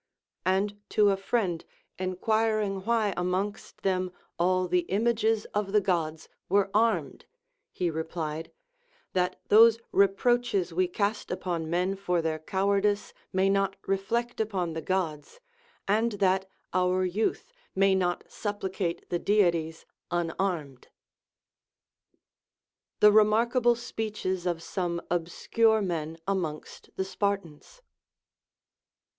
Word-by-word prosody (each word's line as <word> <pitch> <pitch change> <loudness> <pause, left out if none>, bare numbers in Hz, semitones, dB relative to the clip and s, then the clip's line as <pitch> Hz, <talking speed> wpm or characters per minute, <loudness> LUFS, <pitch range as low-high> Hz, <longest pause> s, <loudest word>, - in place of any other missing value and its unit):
And 200 +2 +1
to 205 -1 +4
a - - +2
friend 195 -4 -1 0.4
enquiring 210 +2 0
Avhy 220 -1 +1
amongst 185 +4 -3
them 185 -1 0 0.3
all 185 +1 +2
the 180 -1 +1
images 220 +1 +1
of 205 -1 -1
the 210 - +6
Gods 165 -5 -1 0.2
were 195 +1 +2
armed 225 +2 +1 0.5
he 175 -2 -1
replied, 160 0 -4 0.6
That 180 0 0
those 225 +1 +7
reproaches 200 -2 +2
we 185 +2 +2
cast 200 +4 -2
upon 175 -3 -3
men 180 +3 0
for 180 -3 0
their 160 -1 -1
cowardice 200 +4 0 0.2
may 190 +1 +2
not 195 0 +1
reflect 230 +5 -1
upon 190 -6 -2
the 160 - -4
Gods, 170 - -2 0.5
and 220 +3 +2
that 190 -1 +1 0.2
our 185 0 +2
youth 210 - -1 0.2
may 195 0 +4
not 180 -2 0
suppli 205 -3 -4
cate 175 -3 -3
the 175 - 0
Deities 170 -6 +1 0.2
unarmed. 170 -5 -2 2.1
THE 210 - +8
REMARKABLE 235 +3 +4
SPEECHES 215 -6 -3
OF 170 -2 -2
SOME 175 -3 -2
OBSCURE 215 +6 +2
MEN 165 -3 -3
AMONGST 170 -6 -3
THE 190 - -1
SPARTANS. 200 - -3
190 Hz, 115 wpm, -28 LUFS, 175-210 Hz, 2.1 s, THE